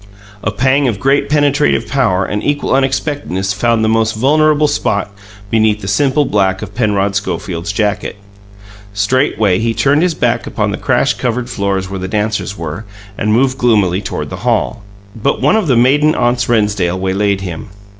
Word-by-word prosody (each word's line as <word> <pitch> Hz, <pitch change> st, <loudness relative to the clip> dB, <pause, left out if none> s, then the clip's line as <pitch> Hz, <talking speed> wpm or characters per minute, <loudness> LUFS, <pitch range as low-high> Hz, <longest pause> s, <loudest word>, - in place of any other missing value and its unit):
A -, -, -1 dB
pang 130 Hz, +6 st, +1 dB
of 110 Hz, -5 st, -2 dB
great 135 Hz, +2 st, +1 dB
penetrative 145 Hz, -5 st, +2 dB
power 100 Hz, -7 st, +1 dB
and 105 Hz, 0 st, -3 dB
equal 145 Hz, 0 st, 0 dB
unexpectedness 130 Hz, -, -1 dB
found 115 Hz, +2 st, +1 dB
the -, -, +1 dB
most 110 Hz, 0 st, +1 dB
vulnerable 150 Hz, +5 st, +3 dB
spot 100 Hz, -9 st, -1 dB, 0.4 s
beneath 110 Hz, -2 st, +2 dB
the 95 Hz, -, -6 dB
simple 135 Hz, +8 st, +2 dB
black 95 Hz, -3 st, 0 dB
of 105 Hz, -1 st, -8 dB
Penrod 100 Hz, -3 st, 0 dB
Schofield's 90 Hz, -1 st, -3 dB
jacket. 105 Hz, 0 st, -2 dB, 0.8 s
Straightway 105 Hz, -3 st, +1 dB
he 115 Hz, 0 st, -1 dB
turned 145 Hz, +2 st, +2 dB
his 175 Hz, -2 st, +1 dB
back -, -, 0 dB
upon -, -, -1 dB
the -, -, -3 dB
crash -, -, +1 dB
covered 125 Hz, 0 st, -3 dB
floors 100 Hz, -3 st, -1 dB
where 95 Hz, 0 st, -5 dB
the 95 Hz, -, -4 dB
dancers 105 Hz, 0 st, -2 dB
were, 85 Hz, +5 st, -5 dB, 0.3 s
and 105 Hz, -, -1 dB
moved 130 Hz, +3 st, +1 dB
gloomily 105 Hz, -7 st, +2 dB
toward -, -, -5 dB
the -, -, -5 dB
hall. -, -, -1 dB, 0.3 s
But 120 Hz, +5 st, -1 dB
one -, -, +3 dB
of 215 Hz, -6 st, +1 dB
the 130 Hz, -4 st, +3 dB
maiden 145 Hz, +5 st, +3 dB
aunts 120 Hz, 0 st, 0 dB
Rennsdale 105 Hz, -6 st, +1 dB
waylaid 95 Hz, +1 st, 0 dB
him. 90 Hz, +1 st, -6 dB
110 Hz, 170 wpm, -15 LUFS, 100-135 Hz, 0.8 s, vulnerable